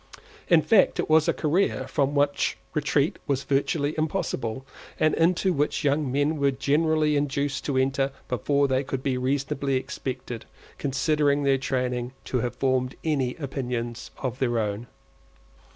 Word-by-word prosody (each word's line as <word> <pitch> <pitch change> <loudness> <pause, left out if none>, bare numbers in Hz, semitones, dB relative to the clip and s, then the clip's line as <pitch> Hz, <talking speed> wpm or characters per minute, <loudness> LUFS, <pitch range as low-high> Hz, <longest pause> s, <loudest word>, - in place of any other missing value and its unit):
In 165 -3 +5
fact 190 +6 +4
it - - -1
was 155 0 +5
a - - +5
career 155 -3 0
from 140 +1 0
which 145 0 +1 0.2
retreat 150 -1 +1
was 140 -1 0
virtually 145 +2 0
impossible, 135 - -2 0.3
and 155 - +3
into 180 +3 +2
which 145 +2 0
young 145 -1 +1
men 145 +3 +1
were 140 -1 +3
generally 150 +3 +2
induced 145 -1 -1
to 140 -3 0
enter 135 +1 +1 0.2
before 140 +4 +1
they 130 0 +1
could 135 -1 -4
be 135 -2 0
reasonably 135 +1 -1
expected, 130 -3 -4 0.3
considering 145 +1 +1
their 135 -1 +3
training, 125 -1 -2
to 125 - -1
have 120 +1 -2
formed 130 -1 0
any 135 -6 0
opinions 125 -5 -4
of 130 -1 -4
their 120 -3 +1
own. 105 +1 -2
140 Hz, 150 wpm, -26 LUFS, 130-150 Hz, 0.3 s, In